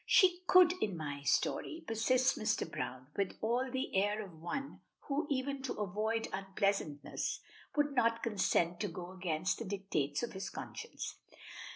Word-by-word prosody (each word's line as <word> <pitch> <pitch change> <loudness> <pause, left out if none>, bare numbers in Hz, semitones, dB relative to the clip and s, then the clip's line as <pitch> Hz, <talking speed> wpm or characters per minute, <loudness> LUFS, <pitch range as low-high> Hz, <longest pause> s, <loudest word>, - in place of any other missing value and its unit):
"She 375 -8 +6
could 365 -1 +8
in 195 -5 0
my 145 -2 -4
story," 315 - +1
persists 255 +2 +3
Mr. 215 -1 0
Browne, 130 +1 -4
with 200 -2 -1
all 245 +4 +1
the 260 -3 -2
air 205 +2 +2
of 165 -4 -14
one 275 +11 -4 0.2
who, 285 +1 -1
even 275 0 -1
to 265 - -2
avoid 215 +3 -1
unpleasantness, 190 -6 -1 0.4
would 290 -1 +2
not 230 -3 +2
consent 180 -5 +2
to - - 0
go 180 0 -6
against 180 -1 -1
the 230 - -4
dictates 185 -7 -1
of 240 - -3
his 190 0 -4
conscience. 465 - -6
215 Hz, 155 wpm, -35 LUFS, 185-260 Hz, 0.4 s, could